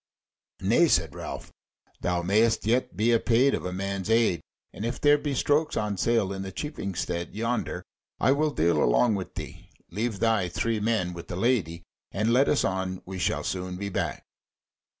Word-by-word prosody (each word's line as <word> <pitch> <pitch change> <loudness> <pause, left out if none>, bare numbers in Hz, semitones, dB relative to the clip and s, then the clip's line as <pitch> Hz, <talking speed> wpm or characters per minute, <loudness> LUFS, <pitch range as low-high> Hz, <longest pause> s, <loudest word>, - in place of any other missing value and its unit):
"Nay," 115 - +4
said 80 - +2
Ralph, - - -7 0.5
"thou 90 -1 -1
mayst 110 +5 +2
yet 115 -5 0
be 110 +3 +3
apaid 120 +4 +3
of - - -2
a - - -4
man's 100 +1 -3
aid; 110 -8 +3 0.3
and - - -7
if 120 +2 -2
there 145 0 +5
be 145 -2 -2
strokes 150 +4 +1
on 105 -1 -1
sale 110 -2 +1
in 95 - -5
the 95 0 -5
cheaping 100 - -5
stead 85 0 -3
yonder, 115 +3 -2 0.4
I 130 - +4
will 150 +2 +2
deal 85 - +2
along 85 - +3
with 95 -2 -4
thee. - - -8 0.2
Leave 110 +3 -2
thy 110 -5 +2
three 105 +7 -1
men 105 -5 0
with 85 -1 -9
the - - -5
Lady, 90 -6 0 0.3
and 110 +3 +1
let 135 +3 +4
us 145 - +2
on; 95 -1 -2
we 95 0 -6
shall - - 0
soon 90 -1 -3
be 100 +1 -4
back." 90 -7 -3
100 Hz, 185 wpm, -27 LUFS, 90-115 Hz, 0.5 s, there